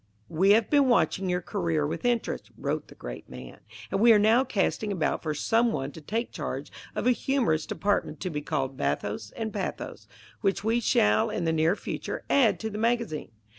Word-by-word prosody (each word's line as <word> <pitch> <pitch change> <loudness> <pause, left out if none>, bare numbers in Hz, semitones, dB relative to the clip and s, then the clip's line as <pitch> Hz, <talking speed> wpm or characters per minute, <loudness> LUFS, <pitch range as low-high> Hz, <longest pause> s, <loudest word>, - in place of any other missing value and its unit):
"We 190 +5 +4
have 220 0 +3
been 285 -3 +4
watching 185 -3 +2
your 180 -1 0
career 165 -7 -1
with 150 - -4
interest," 240 -2 -1
wrote - - -2
the - - -14
great - - -8
man, 65 -1 -10 0.3
"and 195 +1 0
we 235 +1 +7
are - - +6
now 220 +5 +5
casting 205 -2 -1
about 175 -6 0
for 155 -2 -2
some 230 +9 +2
one 135 -4 -3
to 160 - -11
take 225 +10 -3
charge - - -5 0.2
of - - -2
a 250 - +5
humorous 240 - 0
department 200 -7 -1
to 185 - -2
be 150 -1 -3
called 135 -2 -2
'Bathos 105 - -2
and 220 -1 -4
Pathos,' 195 -3 -5 0.3
which 195 -1 0
we 225 +2 +2
shall, 105 - +3
in 170 - -2
the 165 - +1
near 160 +3 +3
future, - - -5
add 260 -6 +4
to 220 0 -3
the 210 - -5
magazine. 230 -8 0
195 Hz, 200 wpm, -27 LUFS, 155-225 Hz, 0.3 s, we